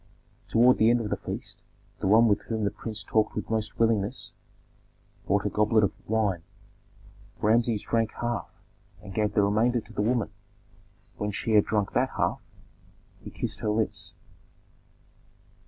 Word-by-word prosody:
Toward 125 +2 +5
the 110 - +5
end 120 +1 +4
of 110 -3 -4
the - - +2
feast - - -7 0.4
the - - -1
one 110 +4 +6
with 105 - +2
whom 110 -2 -2
the 100 - +1
prince 110 -1 -6
talked 110 +4 +1
with 105 - -4
most 110 -1 -2
willingness 110 -3 0 0.9
brought 100 +1 +1
a - - +2
goblet 105 +1 +3
of 100 - +2 0.2
wine. 105 -6 +1 1.0
Rameses 115 0 +2
drank 115 -1 0
half, 120 -3 -2 0.5
and 100 -2 -9
gave 105 0 0
the 105 - +4
remainder 110 +4 +2
to 110 0 -13
the 105 - -1
woman; 115 0 0 0.9
when 105 - -2
she 105 +2 -3
had 105 -1 +5
drunk 105 -3 -1
that - - +2
half, - - 0 0.8
he - - -9
kissed - - -5
her - - -1
lips. 110 +1 -1
110 Hz, 155 wpm, -27 LUFS, 105-115 Hz, 1.0 s, one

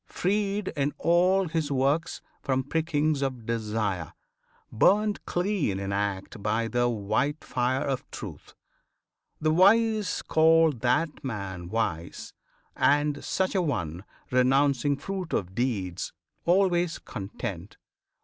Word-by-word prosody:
Freed 200 +1 -1
In 145 0 -2
all 180 +3 +3
his 155 -2 -2
works 140 +5 0 0.2
from 130 -2 0
prickings 155 0 0
of 130 -4 -3
desire, 105 -6 -2 0.6
Burned 205 - +3
clean 175 - 0
in 100 0 -3
act 100 0 -3
by 110 +2 0
the 120 +1 +1
white 115 +7 -1
fire 125 +1 0
of 135 -2 -3
truth, - - -9 0.8
The 155 0 +2
wise 215 +4 +3
call 160 0 +5
that 130 +5 0
man 100 -8 -5
wise; 90 -7 -3 0.4
and 145 0 +2
such 190 0 0
an 185 -4 +1
one, 85 - -3 0.3
Renouncing 135 +2 +3
fruit 185 +2 -5
of 95 -1 -1
deeds, 95 -7 -2 0.3
always 175 -2 +2
content. 100 -3 -7
140 Hz, 115 wpm, -27 LUFS, 110-165 Hz, 0.8 s, call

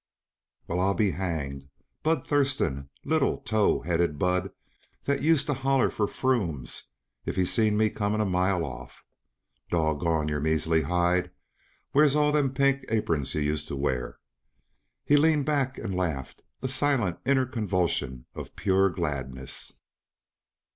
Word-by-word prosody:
"Well, 85 - -1
I'll 95 +1 +2
be 105 -4 +2
hanged! 70 -7 -4 0.3
Bud 160 +1 +1
Thurston 130 - 0 0.2
little, 155 -2 +2
tow 110 -2 +1
headed 85 -3 0
Bud 90 +3 0 0.5
that 140 0 0
used 155 -1 +3
to 145 - 0
holler 135 0 +2
for 105 - 0
'frumes' 90 - -1 0.4
if - - -3
he 95 - +2
seen 105 +2 +2
me 110 0 +3
coming 105 0 -1
a 110 - +2
mile 90 -2 +1
off. - - -9 0.7
Doggone 80 -1 +1
your 75 -1 -1
measly 80 +1 +1
hide, 90 +3 +1 0.6
where's 145 0 +4
all 150 0 +3
them 145 -3 +2
pink 135 0 +2
apurns 80 -11 0
yuh 75 - 0
used 75 0 -1
to - - -4
wear?" 65 -3 -2 0.9
He 145 - +5
leaned 150 -1 +3
back 140 -3 0
and 100 -4 -4
laughed 80 -8 -3 0.2
a - - +1
silent, 135 -9 +1
inner 130 0 +3
convulsion 90 - -1
of - - -8
pure 95 0 +3
gladness. 65 -7 -4
95 Hz, 140 wpm, -27 LUFS, -, 0.9 s, He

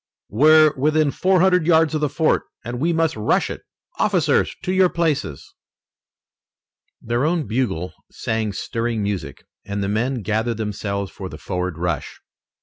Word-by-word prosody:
"We're 155 +6 +5
within 150 +2 +2
four 185 +2 +2
hundred 180 -3 +3
yards 160 -2 +4
of 155 - -1
the 150 - +1
fort, 155 +3 +1 0.2
and 120 +1 -4
we 165 +5 +1
must 165 -1 +1
rush 105 -1 +1
it! - - -7 0.4
Officers, - - +2
to 185 - -1
your 190 -1 +4
places!" 155 - -2 1.5
Their 120 +2 -1
own 160 0 +1
bugle 110 -8 -2 0.2
sang 110 -2 -2
stirring 115 +2 -2
music, 100 -2 -4 0.2
and 100 0 -3
the 100 - -1
men 120 +3 -1
gathered 110 +3 -1
themselves 100 -2 -3
for 95 -2 -7
the 75 - -9
forward 90 -1 -4
rush. 85 -2 -3
120 Hz, 150 wpm, -21 LUFS, 100-155 Hz, 1.5 s, We're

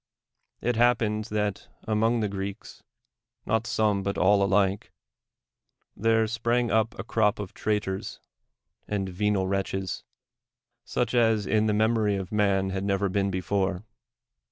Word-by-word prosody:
It 120 -1 0
happened 115 -3 +2
that 105 -3 -2 0.2
among 110 +2 +1
the 105 - +1
Greeks 100 0 -6 0.3
— - - -54
not 110 +1 0
some, 105 -2 +1
l)ut 100 0 -2
all 100 +2 +4
alike— 100 0 +1 1.0
there 115 +2 +2
sprang 115 +1 0
up 110 +1 +1
a - - -4
crop 110 -1 +1
of 100 -3 -6
traitors 105 -3 -2 0.7
and 100 -2 -2
venal 95 +1 0
wretches, 95 0 -2 0.8
such 125 - -2
as 115 -4 +3
in 110 +2 +2
the 105 - +2
memory 110 -1 +2
of 95 -1 -5
man 100 -2 +1
had 95 0 -3
never 100 0 0
been 100 +1 0
before. 95 0 -1
105 Hz, 135 wpm, -27 LUFS, 95-110 Hz, 1.0 s, all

